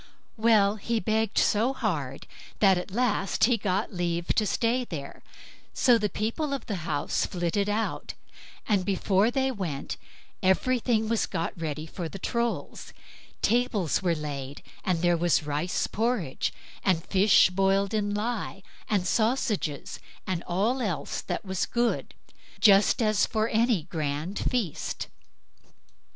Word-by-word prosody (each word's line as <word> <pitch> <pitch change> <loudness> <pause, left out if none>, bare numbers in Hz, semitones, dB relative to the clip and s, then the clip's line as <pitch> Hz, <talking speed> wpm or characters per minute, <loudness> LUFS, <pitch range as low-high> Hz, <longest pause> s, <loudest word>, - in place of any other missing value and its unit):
Well, 215 -2 +4
he 230 +2 -1
begged 220 +1 0
so 230 +6 +3
hard, 155 - -3 0.3
that 195 -2 +5
at 180 +2 -4
last 210 -2 0
he 245 +1 +5
got 200 0 -1
leave 170 -1 -2
to 215 - +2
stay 240 +4 +1
there; 150 - -7 0.5
so 240 -2 +5
the 210 -1 0
people 255 +9 -2
of 270 - -7
the 205 - -3
house 145 - 0
flitted 180 +3 -1
out, 215 +2 -2 0.5
and 205 -4 +2
before 195 +2 +2
they 265 +1 0
went, 170 - -4 0.4
everything 220 +3 +2
was 230 -1 +1
got 165 - -3
ready 155 -2 -4
for 165 +1 -6
the 195 - -7
Trolls; 235 +4 -2 0.6
the - - +5
tables 220 - +1
were 175 -3 +1
laid, 145 -2 -6 0.2
and 175 -2 0
there 175 0 +4
was 170 -1 +2
rice 150 +4 -1
porridge, 220 - -1 0.3
and 175 -4 +1
fish 195 -1 +5
boiled 195 +2 +2
in 205 -1 0
lye, 210 -2 -3 0.3
and 200 -4 +1
sausages, 215 - 0 0.3
and 185 -3 -2
all 215 +9 +1
else 190 -9 -2
that - - -4
was 190 -1 -1
good, 240 0 -1 0.4
just 205 +2 +5
as 215 -1 +3
for 220 0 0
any 225 -3 +2
other 155 - -18
grand 155 +3 -3
feast. 225 - -2
200 Hz, 140 wpm, -27 LUFS, 175-225 Hz, 0.6 s, that